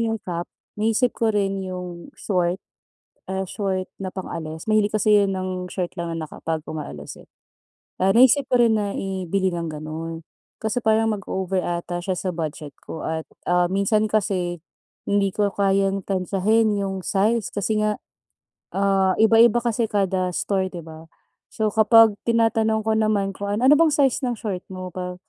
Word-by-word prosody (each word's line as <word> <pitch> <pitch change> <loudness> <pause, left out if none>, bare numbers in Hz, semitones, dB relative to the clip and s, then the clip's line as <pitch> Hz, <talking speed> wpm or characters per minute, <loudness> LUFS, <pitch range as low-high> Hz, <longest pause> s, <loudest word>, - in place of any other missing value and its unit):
yung 225 -1 0
cap, 175 -1 -4 0.3
naisip 225 +3 +2
ko 230 - +1
rin 195 -1 0
'yong 180 +5 -7
short, 180 -2 0 0.7
ah, 190 0 -2
short 190 -2 -2 0.2
na 185 - -3
pang-alis. 160 -4 -6
Mahilig 215 -1 +3
kasi 215 0 +4
yun 195 - +1
ng 185 -1 -4
short 180 -2 -3
lang, 170 0 -3
na 155 - -4
kapag 160 -1 -4
umaalis, 75 - -7
eh. - - -22 0.7
Ah, 190 +1 +3
naisip 260 +3 +6
ko 250 - +4
rin 230 -2 +5
na 205 -1 -2
ibili 190 0 -1
ng 170 -1 -3
ganun, 160 +2 -6 0.4
kasi 220 +2 -1
parang, 220 0 +3
mag-over 190 -1 -2
ata 175 0 -3
siya 185 0 -1
sa 190 - -2
budget 155 -3 -5
ko, 160 - -7
at, 160 0 -2 0.2
ah, 175 0 +3
minsan 210 +2 +2
kasi, 180 -5 0 0.5
hindi 200 -1 +2
ko 205 -1 +2
kayang 195 0 +1
tantiyahin, 205 +3 +1
'yong 195 -1 -3
size, 215 +4 +1
kasi 215 +1 -1
nga, 210 -1 0 0.8
ah, 195 -1 +3
iba-iba 225 +1 +5
kasi 230 -1 +1
kada 190 -3 0
store, 190 -2 0
'di 175 -2 -8
ba? 160 0 -11 0.5
So, 215 -1 0
kapag 220 -1 +6
tinatanong 225 -1 +2
ko 220 - +1
naman 210 -3 +1
kung 200 +1 -6
ano, 220 - -2
"Ano 290 +2 +7
bang 330 - +5
size 275 -3 +2
ng 245 - 0
short 195 -4 -5
mo 185 -1 -7
pa?" 180 0 -5
195 Hz, 165 wpm, -23 LUFS, 180-215 Hz, 0.8 s, Ano